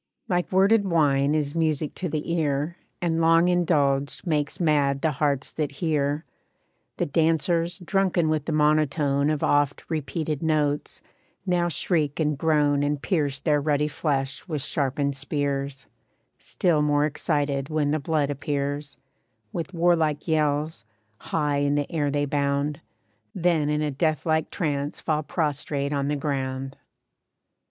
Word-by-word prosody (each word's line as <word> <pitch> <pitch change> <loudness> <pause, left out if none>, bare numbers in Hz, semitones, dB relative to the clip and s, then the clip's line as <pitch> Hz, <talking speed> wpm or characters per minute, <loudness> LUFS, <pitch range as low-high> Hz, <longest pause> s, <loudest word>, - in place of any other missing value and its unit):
Like 180 -1 0
worded 200 +3 +4
wine 150 -5 +2
is 145 -2 -1
music 155 -3 0
to 180 - -4
the 155 +2 -2
ear, 150 0 0 0.3
And 165 -1 +1
long 165 +2 +5
indulged 145 -6 +1
makes 150 -4 -1
mad 145 -4 +2
the 160 - +3
hearts 140 -1 -1
that 150 -3 -3
hear. 145 -1 -1 0.7
The - - 0
dancers, 165 +2 +1
drunken 180 -2 +1
with 155 -2 0
the - - -2
monotone 150 -2 +2
Of 155 -2 -1
oft 145 -1 +2
repeated 155 -1 -2
notes, 150 -2 0 0.4
now 175 -2 +1
shriek 155 -3 -1
and 150 -1 +1
groan 145 -1 +2
And 145 0 0
pierce 145 -4 0
their 150 0 +1
ruddy 150 0 +1
flesh 140 -1 -2
with 150 -6 -3
sharpened 140 0 -1
spears; 140 -1 -2 0.5
Still 165 -4 +1
more 145 0 +2
excited 145 -2 -1
when 150 -2 0
the 155 - +1
blood 145 -1 0
appears, 145 0 -3 0.6
With 170 0 -4
warlike 165 -4 +1
yells, 150 -4 0 0.4
high 150 -2 -1
in 145 0 +1
the 145 +3 -1
air 150 -4 0
they 145 0 0
bound, 140 +1 -1 0.5
Then 170 -5 +2
in 150 0 0
a 150 - -1
deathlike 155 +2 0
trance 145 -4 -2
fall 155 -1 0
prostrate 145 -2 -2
on 140 -1 0
the 145 - 0
ground. 135 -2 -3
150 Hz, 140 wpm, -25 LUFS, 140-160 Hz, 0.7 s, long